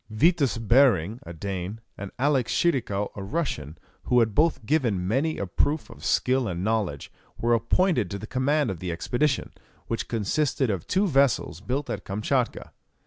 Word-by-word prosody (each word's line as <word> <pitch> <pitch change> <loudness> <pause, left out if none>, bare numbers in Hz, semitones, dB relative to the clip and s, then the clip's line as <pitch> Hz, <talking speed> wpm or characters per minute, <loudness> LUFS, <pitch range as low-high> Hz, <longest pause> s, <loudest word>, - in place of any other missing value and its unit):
Vitus 140 +3 +2
Behring, 115 - +3
a - - -6
Dane, 95 +4 -5 0.2
and 100 0 -7
Alexis 135 -2 +1
Tschirikow, 110 -11 0
a 100 - -6
Russian, 95 - -3 0.3
who 125 - +4
had 110 -3 +2
both 155 -3 +2
given 115 - +1
many 140 +9 0
a - - -2
proof 145 - -1
of - - -13
skill 130 -1 +2
and 90 -1 -3
knowledge, 105 -10 -1 0.3
were 120 +1 +1
appointed 120 - +2
to 100 - -4
the 105 - -7
command 135 +2 +1
of 90 - -6
the 90 0 -3
expedition, 130 - -1 0.3
which 115 - -3
consisted 125 +3 0
of 95 -5 -4
two 195 +2 +2
vessels 135 - +2
built 130 +8 -2
at 100 - -4
Kamtchatka. 115 +5 -1
115 Hz, 165 wpm, -26 LUFS, 100-140 Hz, 0.3 s, who